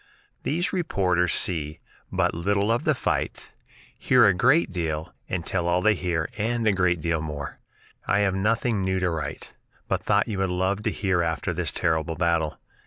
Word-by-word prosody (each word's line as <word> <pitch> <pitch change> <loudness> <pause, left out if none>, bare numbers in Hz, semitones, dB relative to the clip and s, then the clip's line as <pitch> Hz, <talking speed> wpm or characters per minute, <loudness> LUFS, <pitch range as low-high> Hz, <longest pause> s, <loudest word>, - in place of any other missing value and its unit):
These 170 +6 -1
reporters 90 - +1
see 80 -4 0 0.3
but - - +1
little 100 +5 +1
of 115 - 0
the - - +3
fight, - - -2 0.4
hear 125 -3 +4
a 100 - +5
great 130 - +3
deal, 80 -3 -3 0.2
and 90 -2 -2
tell 90 -2 -1
all 85 +1 +2
they 110 - +5
hear 85 -4 -1
and 115 +2 0
a 105 - +4
great 90 -3 +1
deal 85 0 0
more. 75 -2 -6 0.5
"I 100 - +3
have 95 -2 +2
nothing 110 +2 +1
new 95 0 0
to 90 -1 0
write, 80 -3 -5 0.3
but - - 0
thought - - +2
you 105 -4 -3
would 95 -1 +1
love 95 +3 0
to - - -1
hear 95 -4 0
after 85 +2 -1
this 85 -1 -1
terrible 80 -1 0
battle. 85 -2 0
90 Hz, 180 wpm, -25 LUFS, 85-100 Hz, 0.5 s, a